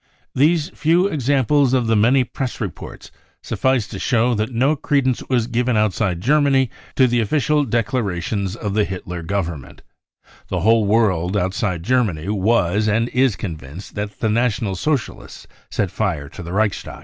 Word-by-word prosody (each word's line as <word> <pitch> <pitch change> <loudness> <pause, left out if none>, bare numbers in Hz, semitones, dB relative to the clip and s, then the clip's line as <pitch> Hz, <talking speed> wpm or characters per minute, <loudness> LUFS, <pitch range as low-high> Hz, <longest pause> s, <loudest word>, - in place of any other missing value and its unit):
These 155 +3 +2
few 170 +4 +2
examples 140 - +2
out - - +5
of 125 - -1
the 115 0 +2
many 120 +5 +4
press 125 +1 -5
reports 100 -7 -7 0.3
suffice 130 -5 0
to - - -7
show 120 -1 +2
that 110 +2 -2
no 130 +6 +2
credence 135 -3 0
was 125 -4 +2
given 120 0 0
outside 100 -4 0
Germany 135 0 +3 0.2
to 130 - +5
the 120 -1 +1
official 150 +6 +1
declarations 105 -5 -1
of 105 -3 -4
the 105 0 +2
Hitler 90 -3 -5
government* 85 -5 -4 0.6
The - - -2
whole 110 0 +4
^ - - -2
world 100 -4 +2
outside 95 -2 -1
Germany 100 -8 0
was 105 -1 +1
and 115 +3 +1
is 130 -4 +2
convinced 80 -1 -8
that 105 0 -5
the 110 - +1
National 110 -2 0
Socialists 135 - -3 0.2
set - - -1
fire 75 -1 -2
to - - -10
the 85 0 -7
Reichstag. 105 +1 -1
110 Hz, 160 wpm, -20 LUFS, 100-130 Hz, 0.6 s, out